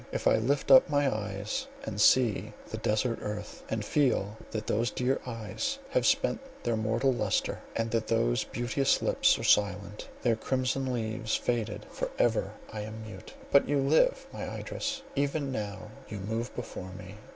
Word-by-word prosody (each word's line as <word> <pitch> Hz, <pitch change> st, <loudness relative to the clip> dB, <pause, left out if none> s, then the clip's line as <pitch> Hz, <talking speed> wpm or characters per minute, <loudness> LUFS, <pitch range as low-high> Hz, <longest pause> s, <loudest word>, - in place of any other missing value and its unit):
If -, -, -3 dB
I -, -, +5 dB
lift 135 Hz, +5 st, +1 dB
up 130 Hz, -, +9 dB
my 145 Hz, -3 st, +2 dB
eyes 105 Hz, -1 st, -3 dB, 0.2 s
and 105 Hz, -, -3 dB
see 120 Hz, -2 st, +4 dB, 0.2 s
the -, -, -3 dB
desart 115 Hz, +2 st, 0 dB
earth, 105 Hz, 0 st, -5 dB
and 110 Hz, -2 st, -2 dB
feel 120 Hz, -8 st, +1 dB
that 110 Hz, -1 st, -4 dB
those 115 Hz, +3 st, +1 dB
dear 130 Hz, +1 st, 0 dB
eyes 125 Hz, -, -3 dB
have -, -, +2 dB
spent 275 Hz, -3 st, +2 dB, 0.2 s
their 120 Hz, -1 st, +1 dB
mortal 115 Hz, +5 st, +1 dB
lustre, -, -, 0 dB, 0.2 s
and 115 Hz, 0 st, -1 dB
that 115 Hz, -1 st, 0 dB
those -, -, +2 dB
beauteous 125 Hz, +3 st, 0 dB
lips -, -, +4 dB
are -, -, -6 dB
silent, 100 Hz, 0 st, +2 dB
their 115 Hz, -2 st, +3 dB
"crimson 130 Hz, +2 st, -1 dB
leaves" 110 Hz, -1 st, -1 dB
faded, 115 Hz, -4 st, -1 dB
for -, -, -3 dB
ever -, -, +2 dB, 0.2 s
I 110 Hz, -, -4 dB
am 110 Hz, +1 st, -7 dB
mute! 110 Hz, -, -10 dB, 0.2 s
But 140 Hz, -, +5 dB
you 145 Hz, -, +3 dB
live, -, -, +3 dB
my -, -, -4 dB
Idris, 275 Hz, -1 st, -4 dB
even 140 Hz, 0 st, 0 dB
now 105 Hz, -2 st, -5 dB, 0.2 s
you 105 Hz, -, -5 dB
move 110 Hz, +5 st, -3 dB
before 95 Hz, -6 st, -6 dB
me! 95 Hz, +2 st, -10 dB
115 Hz, 170 wpm, -30 LUFS, 105-135 Hz, 0.2 s, up